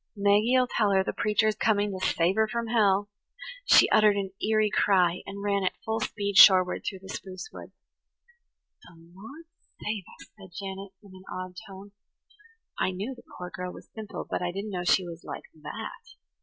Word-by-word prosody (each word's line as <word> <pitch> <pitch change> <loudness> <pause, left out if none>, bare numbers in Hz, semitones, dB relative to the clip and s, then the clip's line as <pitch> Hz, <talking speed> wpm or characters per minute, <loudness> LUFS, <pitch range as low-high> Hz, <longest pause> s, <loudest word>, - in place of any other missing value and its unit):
Maggie'll 210 +5 +3
tell 220 -4 +1
her 190 -1 +3
the - - -3
preacher's 215 +1 +1
coming 210 -1 +1
ter 190 -1 -6
save 175 -1 +2
her 220 +1 +2
from 235 0 -3
hell." 205 -3 +3 0.6
She - - +7
uttered 215 -1 +5
an 195 -1 -3
eerie 215 -1 +2
cry, 180 -3 +2
and 200 0 -7
ran 200 -1 0
at 185 - -1
full 220 0 -1
speed 200 -1 -2
shoreward 185 -2 +7
through 190 -2 -5
the - - -11
spruce 190 - -7
woods. - - -11 1.1
"The 170 - -17
Lord 195 - -13 0.3
save 210 -2 -3 0.2
us!" - - -13
said 185 -3 -13
Janet 195 0 -7
in 200 -2 -15
an 185 0 -14
awed 185 0 -6
tone. 195 +1 -11 0.9
"I - - +1
knew 200 +8 -4
the 245 - -14 0.2
poor 180 0 -7
girl 180 0 -5
was - - -13
simple, 220 -2 -7
but - - -3
I 175 0 -1
didn't 200 +3 -5
know 180 -2 -3
she 180 +1 +3
was 170 -1 -9
like - - -7 0.2
that. 150 - -8
200 Hz, 185 wpm, -27 LUFS, 185-215 Hz, 1.1 s, She